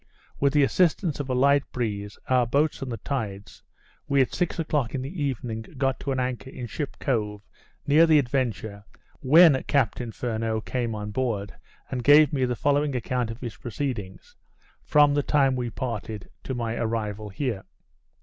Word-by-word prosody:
With 140 Hz, 0 st, +2 dB
the 145 Hz, -1 st, +5 dB
assistance 165 Hz, +1 st, +1 dB
of 140 Hz, -2 st, -4 dB
a 130 Hz, -, 0 dB
light 140 Hz, +2 st, +4 dB
breeze, 105 Hz, -4 st, -3 dB
our 125 Hz, -2 st, +3 dB
boats, 145 Hz, +5 st, +1 dB
and 130 Hz, -2 st, -4 dB
the 115 Hz, -, -3 dB
tides, 105 Hz, -5 st, -5 dB, 0.5 s
we 140 Hz, -1 st, +2 dB
at 130 Hz, -, +2 dB
six 180 Hz, -, -1 dB
o'clock 150 Hz, -7 st, -1 dB
in 130 Hz, -, -2 dB
the 150 Hz, +3 st, -4 dB
evening, 120 Hz, -5 st, -3 dB, 0.2 s
got 135 Hz, 0 st, 0 dB
to 140 Hz, -, -3 dB
an 130 Hz, -, -1 dB
anchor 125 Hz, +1 st, -3 dB
in 125 Hz, -2 st, -7 dB
Ship 145 Hz, +4 st, -5 dB
Cove, 105 Hz, -6 st, -1 dB, 0.4 s
near 155 Hz, +4 st, +5 dB
the 155 Hz, -1 st, +6 dB
Adventure, 115 Hz, -7 st, -1 dB, 0.4 s
when 150 Hz, 0 st, +6 dB
Captain 125 Hz, -3 st, 0 dB
Furneaux 110 Hz, -1 st, -2 dB
came 120 Hz, -1 st, -2 dB
on 105 Hz, 0 st, -5 dB
board, 105 Hz, -4 st, -2 dB, 0.4 s
and 125 Hz, -2 st, -3 dB
gave 145 Hz, +1 st, +6 dB
me 130 Hz, -3 st, +2 dB
the 125 Hz, -1 st, -1 dB
following 145 Hz, +1 st, +1 dB
account 125 Hz, -1 st, -1 dB
of 115 Hz, +1 st, -7 dB
his 120 Hz, -3 st, -5 dB
proceedings, 120 Hz, -6 st, -5 dB, 0.5 s
from 145 Hz, -1 st, +4 dB
the 145 Hz, -, +2 dB
time 140 Hz, -2 st, +2 dB
we 125 Hz, -1 st, -2 dB
parted 110 Hz, -3 st, -5 dB
to 130 Hz, -, -3 dB
my 115 Hz, -2 st, -2 dB
arrival 110 Hz, -2 st, -2 dB
here. 110 Hz, -2 st, -3 dB
125 Hz, 175 wpm, -25 LUFS, 110-140 Hz, 0.5 s, the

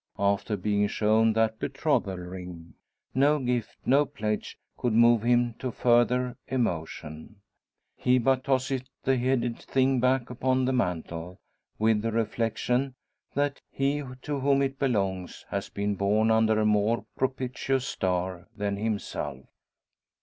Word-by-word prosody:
After 100 Hz, +1 st, +1 dB
being 105 Hz, +1 st, +1 dB
shown 110 Hz, +2 st, +3 dB
that 110 Hz, 0 st, +1 dB
betrothal 95 Hz, -1 st, 0 dB
ring, 90 Hz, -2 st, -8 dB, 0.4 s
no 145 Hz, +3 st, +4 dB
gift, 125 Hz, -4 st, -2 dB
no 140 Hz, +3 st, +5 dB
pledge, 105 Hz, -2 st, -3 dB, 0.2 s
could 120 Hz, -3 st, -1 dB
move 115 Hz, 0 st, +5 dB
him 120 Hz, 0 st, +2 dB
to 130 Hz, -, -2 dB
further 125 Hz, +1 st, +2 dB
emotion. 85 Hz, -6 st, -3 dB, 0.6 s
He 125 Hz, 0 st, +3 dB
but 130 Hz, +1 st, +2 dB
tosses 135 Hz, -1 st, +1 dB, 0.2 s
the 135 Hz, -, +3 dB
headed 125 Hz, -1 st, 0 dB
thing 130 Hz, -1 st, +1 dB
back 125 Hz, 0 st, +1 dB
upon 130 Hz, +1 st, +1 dB
the 130 Hz, -, +1 dB
mantel, 90 Hz, -5 st, -2 dB, 0.4 s
with 110 Hz, -1 st, +2 dB
the 115 Hz, +1 st, -1 dB
reflection 115 Hz, +4 st, 0 dB, 0.4 s
that 145 Hz, 0 st, 0 dB
he 140 Hz, +2 st, 0 dB, 0.2 s
to 145 Hz, -1 st, -2 dB
whom 140 Hz, +1 st, +3 dB
it 135 Hz, 0 st, -2 dB
belongs 95 Hz, -9 st, -1 dB
has -, -, -3 dB
been 100 Hz, 0 st, -1 dB
born 105 Hz, +3 st, +2 dB
under 110 Hz, -1 st, +3 dB
a 110 Hz, -, +2 dB
more 105 Hz, +2 st, +2 dB
propitious 130 Hz, 0 st, -1 dB
star 90 Hz, -3 st, -2 dB
than 100 Hz, -1 st, -1 dB
himself. 100 Hz, -11 st, -3 dB
115 Hz, 135 wpm, -27 LUFS, 100-130 Hz, 0.6 s, no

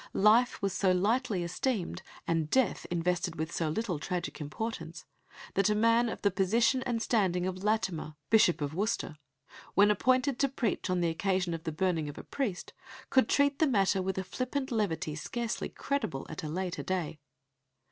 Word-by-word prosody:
Life 215 Hz, +3 st, +4 dB
was 195 Hz, -2 st, +1 dB
so 190 Hz, -1 st, +2 dB
lightly 205 Hz, +1 st, +1 dB
esteemed, 180 Hz, +1 st, -2 dB, 0.3 s
and 165 Hz, -2 st, 0 dB
death 260 Hz, +4 st, +1 dB
invested 175 Hz, 0 st, 0 dB
with 160 Hz, +1 st, -3 dB
so 165 Hz, -2 st, -1 dB
little 180 Hz, -2 st, -2 dB
tragic 175 Hz, 0 st, -4 dB
importance, 165 Hz, +1 st, -5 dB, 0.5 s
that 195 Hz, +1 st, +3 dB
a 210 Hz, -, +2 dB
man 230 Hz, +2 st, +3 dB
of -, -, -6 dB
the 200 Hz, -, +4 dB
position 225 Hz, +7 st, +2 dB
and 235 Hz, -2 st, 0 dB
standing 190 Hz, -6 st, +1 dB
of 185 Hz, 0 st, -4 dB
Latimer, 190 Hz, -8 st, -1 dB, 0.2 s
Bishop 215 Hz, -8 st, +5 dB
of 145 Hz, 0 st, -2 dB
Worcester, 190 Hz, -5 st, -2 dB, 0.6 s
when 205 Hz, +1 st, +6 dB
appointed 255 Hz, +5 st, +2 dB
to 275 Hz, -, +3 dB
preach 240 Hz, -7 st, -2 dB
on 180 Hz, -1 st, +1 dB
the 170 Hz, -, +2 dB
occasion 185 Hz, +1 st, 0 dB
of 165 Hz, -1 st, -6 dB
the 160 Hz, -, -1 dB
burning 165 Hz, -2 st, 0 dB
of 145 Hz, -, -9 dB
a -, -, -7 dB
priest, 220 Hz, -11 st, -3 dB, 0.4 s
could 260 Hz, -4 st, +4 dB
treat 285 Hz, 0 st, +3 dB
the 315 Hz, -, +4 dB
matter 195 Hz, -6 st, +2 dB
with 190 Hz, 0 st, -2 dB
a 190 Hz, -, -1 dB
flippant 255 Hz, +7 st, -3 dB
levity 195 Hz, -9 st, -1 dB
scarcely 230 Hz, +9 st, -3 dB
credible 275 Hz, -, -3 dB
at 155 Hz, -, -5 dB
a 155 Hz, -, -5 dB
later 180 Hz, +2 st, -3 dB
day. 175 Hz, -5 st, -3 dB
190 Hz, 180 wpm, -30 LUFS, 170-230 Hz, 0.6 s, when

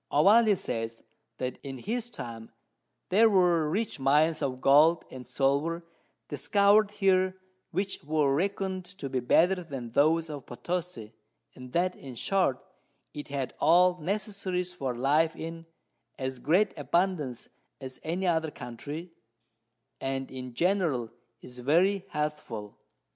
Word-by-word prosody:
Ovalle 205 Hz, +7 st, +5 dB
says, 115 Hz, -6 st, -4 dB, 0.3 s
That 125 Hz, 0 st, -4 dB
in 135 Hz, -2 st, -7 dB
his 230 Hz, -, -3 dB
time 115 Hz, -, -8 dB, 0.6 s
there 220 Hz, +4 st, +5 dB
were 175 Hz, -6 st, +3 dB
rich 205 Hz, 0 st, -2 dB
Mines 150 Hz, +4 st, +3 dB
of 130 Hz, -3 st, -2 dB
Gold 150 Hz, +5 st, +5 dB
and 130 Hz, -1 st, -9 dB
Silver 145 Hz, +5 st, 0 dB, 0.4 s
discover'd 200 Hz, -, +3 dB
here, 190 Hz, -2 st, +2 dB, 0.3 s
which 195 Hz, +3 st, -3 dB
were 150 Hz, -2 st, +1 dB
reckon'd 190 Hz, +3 st, -1 dB
to 140 Hz, -, -5 dB
be 130 Hz, -, 0 dB
better 180 Hz, +9 st, +3 dB
than 135 Hz, -7 st, -7 dB
those 160 Hz, +5 st, +3 dB
of 145 Hz, -4 st, -8 dB
Potosi, 140 Hz, -5 st, -5 dB, 0.4 s
and 125 Hz, -1 st, -11 dB
that 180 Hz, +1 st, +1 dB
in 130 Hz, -3 st, -10 dB
short 180 Hz, -2 st, 0 dB, 0.5 s
it 145 Hz, -, -7 dB
had 140 Hz, -3 st, -3 dB
all 180 Hz, +3 st, +5 dB
Necessaries 190 Hz, -1 st, -2 dB
for 135 Hz, -8 st, -3 dB
Life 150 Hz, +6 st, +2 dB
in 165 Hz, 0 st, -7 dB, 0.5 s
as 130 Hz, -2 st, -4 dB
great 175 Hz, -, +2 dB
abundance 155 Hz, -5 st, -1 dB, 0.3 s
as 130 Hz, -2 st, -9 dB
any 175 Hz, +4 st, -2 dB
other 160 Hz, -3 st, +1 dB
Country, 145 Hz, +7 st, -7 dB, 0.9 s
and 135 Hz, 0 st, -3 dB
in 130 Hz, -2 st, -7 dB
general 170 Hz, -, +1 dB, 0.3 s
is 125 Hz, 0 st, -10 dB
very 180 Hz, +9 st, +2 dB
healthful. 150 Hz, -9 st, -4 dB
155 Hz, 130 wpm, -28 LUFS, 135-185 Hz, 0.9 s, Ovalle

